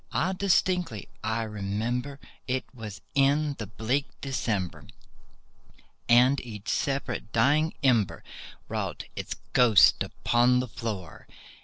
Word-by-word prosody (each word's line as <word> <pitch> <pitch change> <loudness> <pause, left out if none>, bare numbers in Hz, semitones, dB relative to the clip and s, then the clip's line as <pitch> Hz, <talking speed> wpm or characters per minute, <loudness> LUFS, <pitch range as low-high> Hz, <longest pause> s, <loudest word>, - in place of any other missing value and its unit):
Ah, 185 +3 0
distinctly 180 - +1 0.2
I 110 +1 -1
remember, 110 +6 -3 0.3
it 130 0 -1
was 110 -5 -8
in 145 +2 +3
the 110 - -4
bleak 115 +7 -1
December, 110 -9 -2 1.2
And 125 +3 +5
each 105 -4 -8
separate 135 -5 -2
dying 150 +7 +2
ember 120 -7 +2 0.4
wrought - - -3
its - - -4 0.2
ghost 120 -4 +6
upon 125 +1 +2
the 125 - -2
floor. 105 -7 -6
125 Hz, 110 wpm, -27 LUFS, 110-140 Hz, 1.2 s, ghost